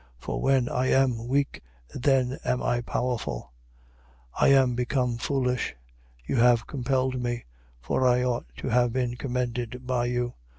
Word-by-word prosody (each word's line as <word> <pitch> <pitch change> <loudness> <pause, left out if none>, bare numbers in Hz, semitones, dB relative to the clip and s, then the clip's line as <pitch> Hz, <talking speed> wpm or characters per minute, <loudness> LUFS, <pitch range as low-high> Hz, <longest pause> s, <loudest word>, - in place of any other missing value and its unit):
For - - -4
when 135 -2 +3
I 130 +1 0
am 125 -4 +2
weak, 140 +2 0 0.3
then 130 -1 +1
am 125 - 0
I 120 0 +1
powerful. 120 - -3 0.9
12:11. - - +3
I - - +6
am 135 -2 +5
become 125 0 0
foolish. 125 - -1 0.5
You 130 - -1
have 120 0 +4
compelled 130 -1 -1
me: 120 -1 -3 0.3
for 125 - +1
I 125 0 +3
ought 125 - -1
to - - -4
have 120 0 +3
been 125 -2 -1
commended 125 -1 -3
by 125 -1 0
you. 120 0 -1
125 Hz, 155 wpm, -27 LUFS, 120-130 Hz, 0.9 s, I